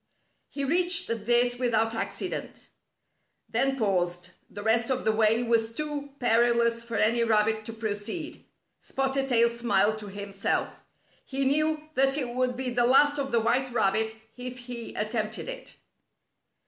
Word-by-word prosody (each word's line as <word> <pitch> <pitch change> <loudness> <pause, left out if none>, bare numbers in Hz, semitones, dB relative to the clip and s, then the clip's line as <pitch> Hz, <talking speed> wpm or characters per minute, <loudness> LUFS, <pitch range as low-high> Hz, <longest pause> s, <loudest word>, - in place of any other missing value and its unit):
He 280 - -4
reached 350 +5 +3 0.2
this 245 0 +3
without 225 -2 +1
accident. 225 - -5 0.8
Then 270 +3 0
paused. 180 -4 -1 0.2
The 205 - -8
rest 225 +2 +2
of 260 -1 -1
the 220 - +4
way 220 +2 +3
was 230 -1 +1
too 290 +2 -4
perilous 235 -1 +2
for 235 -1 -6
any 235 +2 +3
rabbit 220 -1 +1
to 230 - -5
proceed. 220 - -4 0.4
Spotted 270 0 -2
Tail 235 -2 +5
smiled 220 -3 +1
to 210 - -6
himself. 200 0 -3 0.4
He 270 0 -2
knew 305 +2 +1
that 270 +1 +2
it 260 -5 -2
would 250 0 -1
be 255 -1 -2
the 240 0 +2
last 290 +3 +5
of 270 -1 -3
the 235 -1 +2
white 255 +3 +1
rabbit 220 0 +1 0.2
if 250 0 -6
he 245 -2 -7
attempted 215 - -2
it. - - -8
235 Hz, 150 wpm, -27 LUFS, 220-270 Hz, 0.8 s, Tail